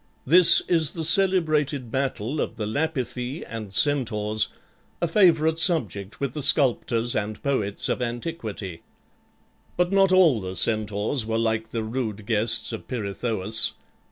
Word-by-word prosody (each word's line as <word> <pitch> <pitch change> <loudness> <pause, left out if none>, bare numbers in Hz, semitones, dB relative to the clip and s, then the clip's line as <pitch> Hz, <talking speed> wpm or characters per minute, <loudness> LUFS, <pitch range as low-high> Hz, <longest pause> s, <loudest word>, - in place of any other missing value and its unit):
This 175 +5 +7
is 160 -4 +2
the 165 - -4
celebrated 155 - +1
battle 135 +1 -2
of - - -4
the 110 - -4
Lapithae 130 +1 -3
and 110 -4 -7
Centaurs, 110 -4 +1 0.5
a 170 - 0
favorite 160 -3 +3
subject 110 - -1
with 140 -3 -3
the 150 - -5
sculptors 120 -4 +2
and 105 0 -4
poets 105 -8 -1
of - - -2
antiquity. 115 - -5 1.0
But 180 +1 +1
not 195 -1 +4
all 170 - +4
the 95 0 -6
Centaurs 110 - +1
were 110 0 -1
like 110 -1 -1
the 115 -1 -4
rude 110 -3 -5
guests 110 +1 +1
of 110 - -8
Pirithous. 110 -2 -1
120 Hz, 135 wpm, -24 LUFS, 110-155 Hz, 1.0 s, This